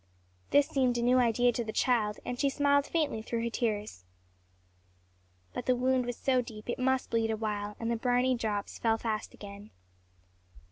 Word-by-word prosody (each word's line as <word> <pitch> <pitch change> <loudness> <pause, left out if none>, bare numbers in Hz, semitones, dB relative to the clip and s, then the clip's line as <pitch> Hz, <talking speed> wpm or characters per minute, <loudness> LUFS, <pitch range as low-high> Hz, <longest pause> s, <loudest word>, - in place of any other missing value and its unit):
This 285 0 +4
seemed 255 -3 +1
a 235 - 0
new 250 +1 +4
idea 245 0 +3
to 240 0 -2
the 220 - -4
child, 220 -4 +1
and 245 0 -4
she 280 - +3
smiled 285 0 +2
faintly 300 -9 0
through 230 +1 -3
her 235 - -2
tears. 210 - -2 1.5
But - - -5
the 255 - +4
wound 255 0 +1
was 245 - -3
so 255 -2 +2
deep 220 -3 -10
it - - -4
must 260 0 +1
bleed 225 -1 +1
awhile, 210 -2 -2
and 230 0 -2
the - - +1
briny 250 +2 +2
drops 215 -4 -3
fell 225 -1 +2
fast 220 -2 -3
again. 200 +1 -10
235 Hz, 180 wpm, -30 LUFS, 220-255 Hz, 1.5 s, This